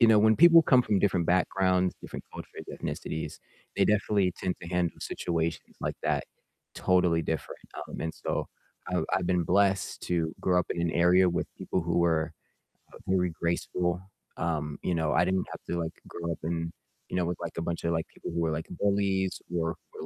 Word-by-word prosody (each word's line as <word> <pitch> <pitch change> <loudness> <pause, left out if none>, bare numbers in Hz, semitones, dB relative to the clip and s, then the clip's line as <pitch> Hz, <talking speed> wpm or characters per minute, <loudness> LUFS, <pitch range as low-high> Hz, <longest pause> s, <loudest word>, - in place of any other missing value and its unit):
you 115 - +7
know, 110 -1 +7
when 110 +1 +6
people 170 +1 +9
come 130 -4 +5
from 100 -4 +2
different 90 -4 +2
backgrounds, 90 0 +2
different - - -8
cultures, - - -8
ethnicities, 80 - -4 0.4
they - - +4
definitely 100 -3 +2
tend 90 - -2
to 85 - -8
handle 90 -1 0
situations 85 -1 -2
like - - -2
that - - +1 0.5
totally 90 -3 +3
different, 80 0 -4 0.3
um, - - -7
and 80 - -2
so - - -2 0.4
I've - - 0
I've 95 -2 0
been 90 -1 +2
blessed 95 +1 +2
to 85 -2 0
grow 90 -1 +3
up 90 - +1
in 85 - -1
an 85 - +1
area 90 +2 +5
with 85 0 -1
people 95 - -1
who 85 0 0
were, 80 -2 +2 0.6
uh, - - -10
very 90 -2 +2
graceful, 85 +2 -1 0.4
um, 75 -3 -2
you 90 - +1
know, 80 -2 +1
I 85 +3 +4
didn't 95 0 0
have - - -7
to, 85 - 0
like, 80 - -2 0.2
grow 85 0 -4
up - - -6
in 80 0 -2 0.4
you - - -3
know, 90 - +2
with, 90 0 -2
like, - - -5
a 85 - -1
bunch 85 0 -3
of, 85 - +1
like, 80 -1 -1
people - - -8
who 85 - -1
were, 80 -1 +1
like, 80 +1 -3
bullies 100 -2 +1
or 85 -1 0 0.2
who - - -8
90 Hz, 200 wpm, -29 LUFS, 85-95 Hz, 0.6 s, people